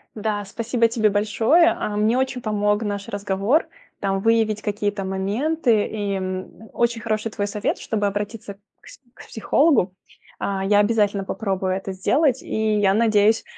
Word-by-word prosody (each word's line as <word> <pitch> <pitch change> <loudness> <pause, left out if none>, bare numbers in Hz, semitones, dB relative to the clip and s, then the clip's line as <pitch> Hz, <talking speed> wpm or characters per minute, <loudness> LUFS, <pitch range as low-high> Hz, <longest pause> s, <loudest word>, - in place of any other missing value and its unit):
Да, 210 -1 -2
спасибо 230 +3 0
тебе 220 -2 +1
большое. 220 - +3
А, 210 -11 -3
мне 215 +3 +2
очень 260 -1 -1
помог 210 -1 0
наш 205 -1 -4
разговор, 205 - 0 0.3
там 195 -1 -1
выявить 220 -1 +2
какие-то 205 -1 -2
моменты, 215 +6 0
и, 205 -2 -3
м, 185 +3 -6
очень 235 -1 0
хороший 215 0 -2
твой 205 -1 -2
совет, 205 0 -2
чтобы 210 -2 -1
обратиться 205 0 -5 0.2
к - - -20
с - - -14
к - - -14
психологу. 225 - +2 0.5
А, 195 -1 -2
я 205 +1 +3
обязательно 205 -2 +2
попробую 190 -2 -2
это 195 0 -4
сделать 265 - +1
и, 220 -1 0
я 195 -1 +3
надеюсь, 220 0 +3
210 Hz, 155 wpm, -22 LUFS, 200-225 Hz, 0.5 s, большое